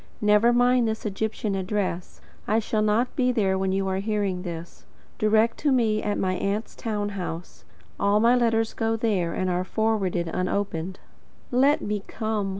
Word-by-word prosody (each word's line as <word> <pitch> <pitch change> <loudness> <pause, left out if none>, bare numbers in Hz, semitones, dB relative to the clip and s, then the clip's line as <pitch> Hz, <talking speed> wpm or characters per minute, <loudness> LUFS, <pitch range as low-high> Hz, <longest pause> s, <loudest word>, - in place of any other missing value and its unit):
Never 210 +3 +5
mind 245 0 +3
this 220 0 -3
Egyptian 215 0 -2
address. 190 -2 -3 0.3
I 215 - +2
shall 215 -1 0
not 215 +4 +1
be 255 -4 +2
there 200 -6 +1
when 190 0 0
you 195 0 0
are 190 0 -1
hearing 200 -3 -1
this. 170 -2 -7 0.4
Direct 220 +2 +3
to 295 - +1
me 220 -4 +2
at 205 - -1
my 185 -1 0
aunt's 200 +4 -2
town 210 -2 -3
house. 180 -3 -6 0.3
All 200 +1 +3
my 235 +3 +5
letters 225 -2 +1
go 225 0 0
there, 205 -7 0
and 185 - -1
are 180 0 0
forwarded 195 -4 0
unopened. 185 0 -2 0.5
LET 275 +4 +3
ME 210 -1 -2
COME. 215 -3 -2
210 Hz, 165 wpm, -25 LUFS, 190-225 Hz, 0.5 s, Never